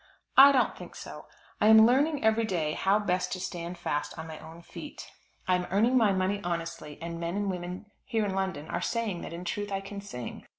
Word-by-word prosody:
I 275 +1 +10
don't 265 -2 +2
think - - -11
so. - - -9 0.3
I 210 - +5
am 220 0 +9
learning 280 +5 +2
every 220 +1 +3
day 170 -8 -1
how 195 +5 +2
best 185 -3 -1
to 185 - -4
stand 175 -1 -5
fast 145 -3 -3
on 160 - -6
my 160 -1 -8
own 165 +2 -12
feet. - - -9 0.4
I 185 - +3
am 180 0 0
earning 220 +7 +3
my 225 -5 +5
money 190 +1 0
honestly, 165 -3 -4
and 170 +1 -5
men 170 +2 -3
and 205 -1 0
women 180 +2 -6 0.2
here 220 -2 0
in 195 - -2
London 190 -6 -2
are 175 - -3
saying 220 -5 -2
that - - -7
in 170 +2 -7
truth 205 +3 -3
I 195 0 -1
can 200 +1 -7
sing. 125 - -8
190 Hz, 220 wpm, -29 LUFS, 170-210 Hz, 0.4 s, I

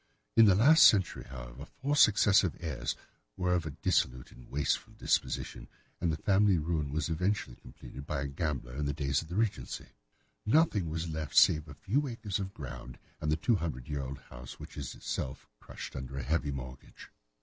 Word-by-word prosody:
In 115 - +8
the 100 -3 +6
last 145 +11 +8
century, 95 -5 +2
however, - - -9
four 140 +2 0
successive 100 - +5
heirs 65 -8 -3 0.4
were 90 0 +1
of 85 -3 0
a 70 - -7
dissolute 60 0 +1
and 60 - -15
wasteful 75 +1 -1
disposition, - - -1 0.3
and 85 -1 +1
the 80 - -2
family 100 +2 +3
ruin 80 -2 -1
was 75 0 -1
eventually 85 -5 -1
completed 70 +2 -11
by 70 -2 -2
a 70 - -2
gambler 70 -4 -3
in 75 +1 -2
the 70 - -1
days 70 -2 0
of 80 - -11
the 85 - -6
Regency. 110 -1 -2 0.5
Nothing 110 - +3
was 80 +2 -3
left 80 -2 -4
save 75 0 +6
a - - -10
few 140 +8 0
acres 110 -6 -3
of 95 -1 -4
ground, 70 -5 -8 0.2
and 75 - -1
the 80 - +2
two 115 +6 +2
hundred 70 -8 -4
year 75 -2 -2
old 70 +1 -5
house, - - -10
which - - -10
is 70 -4 -6
itself 65 - -5
crushed - - -9
under 65 0 -6
a 65 - -3
heavy 75 +2 0
mortgage. 65 -2 -8
80 Hz, 190 wpm, -31 LUFS, 70-95 Hz, 0.5 s, In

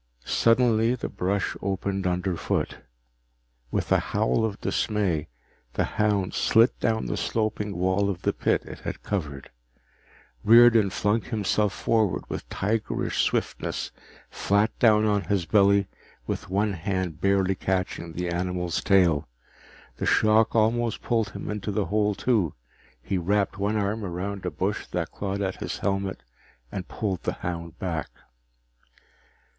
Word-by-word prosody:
Suddenly 115 0 +3
the 125 - -5
brush 95 +2 -1
opened 95 0 -2
underfoot. 90 -1 -1 0.9
With - - -2
a - - +5
howl 110 +2 0
of 105 -2 -2
dismay, 95 -8 0 0.5
the - - +1
hound 105 -3 0
slid 115 +3 +4
down 110 -1 0
the - - -2
sloping 105 -3 -2
wall 95 +3 +1
of 90 -3 -4
the - - +1
pit - - 0
it - - -9
had - - -6
covered. 75 -9 -4 0.9
Riordan 115 -2 +7
flung 105 +4 +1
himself 105 -2 0
forward 110 -5 +1
with - - -6
tigerish 110 +2 -1
swiftness, - - -2 0.4
flat 100 +2 +1
down 110 -2 +5
on 105 -2 +1
his 100 -4 0
belly 100 +2 +4 0.4
with - - -4
one 100 +2 +1
hand 90 -2 -3
barely 100 -1 +2
catching 90 -3 -2
the 90 +1 -3
animal's 90 0 -1
tail. 90 -7 +3 0.7
The - - -2
shock 110 +1 +4
almost 115 +1 +1
pulled 115 -3 +1
him - - -7
into 105 0 -3
the 100 0 0
hole 105 -1 +1
too. 105 - +1 0.5
He 95 -2 -1
wrapped 100 +3 0
one 105 +2 0
arm 105 +2 -1
around 95 +1 -4
a - - +1
bush 100 +4 -2
that 85 -1 -3
clawed 100 0 -3
at 95 -1 -2
his - - -4
helmet 95 -1 -2 0.5
and 95 -2 -5
pulled 95 -5 -3
the - - -2
hound 85 -1 -4
back. 85 -4 -3
100 Hz, 140 wpm, -26 LUFS, 90-110 Hz, 0.9 s, Riordan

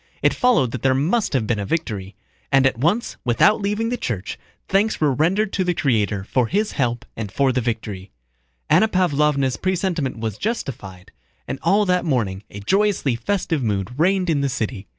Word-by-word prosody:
It - - +4
followed 240 - +2
that 125 - -5
there 130 -1 +3
must 175 - +1
have 125 -5 +1
been 110 -1 -1
a - - -2
victory. 105 - -3 0.4
And 135 -1 +4
at 130 -3 +1
once, 180 - 0
without 125 - +3
leaving 210 +3 -1
the 245 - -1
church, 105 - -4 0.3
thanks 205 +3 +1
were 150 -3 +2
rendered 190 +9 +1
to 190 - +1
the 180 -1 0
Creator 105 -9 0
for 120 +3 0
His 210 - 0
help 120 -4 -1
and 105 -3 -5
for 135 +3 +2
the 125 0 0
victory. 110 -5 -4 0.6
Anna 220 - +5
Pávlovna's 150 - +1
presentiment 180 -8 -1
was 110 -2 -4
justified, 100 - -5 0.4
and 130 +2 -4
all 200 +5 +3
that 180 -2 +1
morning 115 - -1
a 100 - -9
joyously 195 - +1
festive 170 +2 -1
mood 100 -4 -1
reigned 185 +2 +2
in 145 -3 +1
the 140 - 0
city. 110 -4 -4
135 Hz, 185 wpm, -21 LUFS, 115-185 Hz, 0.6 s, Anna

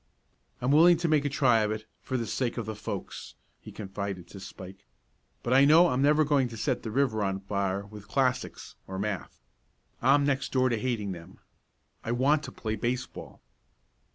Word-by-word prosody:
"I'm 125 +2 +1
willing 170 +4 +6
to 170 +1 -1
make 150 -2 +2
a - - +1
try 130 -5 +3
of 105 -1 +1
it 110 0 -4 0.2
for 130 - -3
the 115 - -2
sake 120 +3 -2
of 115 - -3
the 110 - -4
folks," 105 - -7 0.2
he - - -11
confided 100 -3 -6
to 100 - -10
Spike; 95 - -11 0.6
"but 120 - 0
I 135 +1 +6
know 165 +5 +6
I'm 125 -2 0
never 150 +2 +4
going 140 -3 +2
to 115 -1 -9
set 120 +3 -1
the 110 - -5
river 110 -3 +1
on 95 -1 -1
fire 100 0 -2
with 105 0 -12
classics 130 -2 -1
or 95 - -6
math. 100 -2 -4 0.6
I'm 140 +3 +4
next 135 -1 -1
door 130 -1 +2
to 115 -3 -1
hating 110 -5 -2
them. 85 -2 -10 0.7
I 115 - -2
want 140 +5 +3
to - - -8
play 110 -1 -4
baseball." 125 +3 -4
120 Hz, 190 wpm, -28 LUFS, 100-135 Hz, 0.7 s, willing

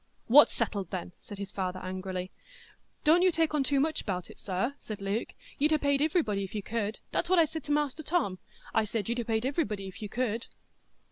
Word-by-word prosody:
"What's 290 +6 +8
settled, 205 -5 -2
then?" 180 -1 -4
said 205 - -10
his 200 0 -6
father, 185 -1 -2
angrily. 185 0 -4 0.7
"Don't 320 +3 +6
you 370 - +6
take 325 -2 +1
on 295 -2 +2
too 275 +1 +2
much 315 +3 +1
bout 180 -3 -3
it, - - -16
sir," 195 +7 -1
said 215 -2 -7
Luke. 200 +3 -2 0.2
"You'd 300 +3 +4
ha' 305 - +3
paid 280 -1 +2
iverybody 295 - +1
if 195 - -7
you 205 - -2
could,—that's 225 - -2
what 370 - +5
I 335 - +7
said 315 -1 -6
to 295 - -3
Master 295 0 +1
Tom,—I 265 - -1
said 215 0 -2
you'd 240 +1 0
ha' 235 - -8
paid 220 -1 +1
iverybody 215 - -1
if 190 - -10
you 210 - -4
could." 235 0 -1
225 Hz, 210 wpm, -30 LUFS, 195-295 Hz, 0.7 s, What's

